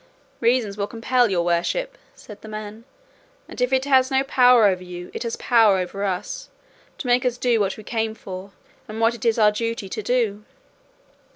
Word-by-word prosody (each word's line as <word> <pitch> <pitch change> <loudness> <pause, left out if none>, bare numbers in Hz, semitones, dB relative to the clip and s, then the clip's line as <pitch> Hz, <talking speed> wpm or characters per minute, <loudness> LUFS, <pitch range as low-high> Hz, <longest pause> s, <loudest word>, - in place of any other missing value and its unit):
"Reason 235 -3 +1
will 200 -1 -2
compel 240 +1 +1
your 175 -3 0
worship," - - -1 0.2
said 210 -2 -13
the - - -11
man, 215 +1 -8 0.6
"and - - -8
if 250 +1 +1
it 265 0 +1
has 260 -2 +4
no 265 -1 +2
power 250 -4 +5
over 185 -2 +1
you, 180 0 -9
it - - -6
has 230 -1 -3
power 225 -5 +4
over 185 +2 -4
us, 195 - -4 0.5
to - - -7
make 245 0 +2
us 250 -1 -1
do 245 -2 +1
what 200 -2 -1
we 215 - -10
came 220 0 -2
for, 190 -2 -8 0.4
and 215 +1 -7
what 230 +1 +3
it 235 0 -8
is 230 -1 +2
our 210 -2 +5
duty 230 -1 -3
to 215 - -4
do." 215 -2 0
225 Hz, 195 wpm, -22 LUFS, 200-245 Hz, 0.6 s, power